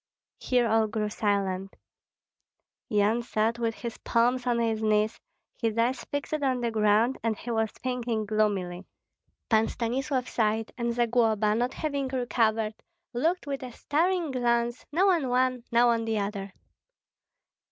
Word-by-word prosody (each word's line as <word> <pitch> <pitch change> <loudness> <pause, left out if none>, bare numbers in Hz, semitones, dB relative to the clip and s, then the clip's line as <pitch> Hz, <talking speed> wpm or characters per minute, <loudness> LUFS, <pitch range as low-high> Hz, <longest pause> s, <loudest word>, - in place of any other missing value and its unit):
Here 245 -2 +2
all 220 0 +3
grew 210 -1 -2
silent. 195 -2 -1 1.1
Yan 210 +3 +2
sat 230 0 0
with 230 -1 -1
his 235 -2 -6
palms 245 +2 +1
on 240 -1 +2
his 225 -2 0
knees, 215 0 +1 0.4
his 225 -2 0
eyes 240 +3 +1
fixed 285 +1 -4
on 260 -3 +1
the 235 -1 0
ground, 215 +3 +2
and 225 -2 -1
he 240 - -6
was 225 -1 +1
thinking 240 -3 -3
gloomily. 200 -4 -1 0.6
Pan 220 -1 +3
Stanislav 255 +2 -2
sighed; 220 0 0
and 235 -1 -1
Zagloba, 225 -3 +2
not 245 +3 -1
having 280 -3 -2
recovered, 225 -4 0 0.4
looked 330 +9 0
with 280 -1 -3
a 255 -1 -6
staring 335 +5 0
glance, 240 -1 0
now 360 +6 +3
on 325 -8 +2
one, 255 -1 +1
now 240 +1 +5
on 230 -1 +1
the 225 -1 0
other. 200 -1 -3
235 Hz, 145 wpm, -27 LUFS, 215-250 Hz, 1.1 s, now